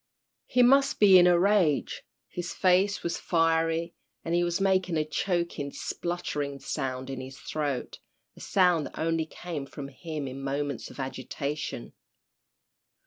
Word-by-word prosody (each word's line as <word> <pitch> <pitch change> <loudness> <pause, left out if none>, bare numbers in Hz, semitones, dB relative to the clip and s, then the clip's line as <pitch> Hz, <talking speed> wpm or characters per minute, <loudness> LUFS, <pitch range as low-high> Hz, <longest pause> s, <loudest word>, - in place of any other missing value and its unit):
He 250 - +4
must 275 +3 +4
be 195 -3 +8
in 175 - +6
a 175 -1 +5
rage. 180 -6 +2 0.3
His 175 0 -5
face 190 +2 +3
was 170 -1 -2
fiery, 165 0 +1 0.3
and 165 - -2
he 175 0 +3
was 175 +1 0
making 185 -3 +2
a 155 - +1
choking, 165 -2 -2
spluttering 145 -6 -4
sound 130 -1 -3
in 130 -1 -5
his 130 0 -9
throat, 145 -5 -3 0.4
a - - -15
sound 180 -5 +2
that - - -13
only 165 0 0
came 160 -5 -6
from 140 0 -8
him 150 0 -6
in 130 +1 -7
moments 140 -1 -3
of - - -13
agitation. 140 0 -4
165 Hz, 145 wpm, -28 LUFS, 140-180 Hz, 0.4 s, be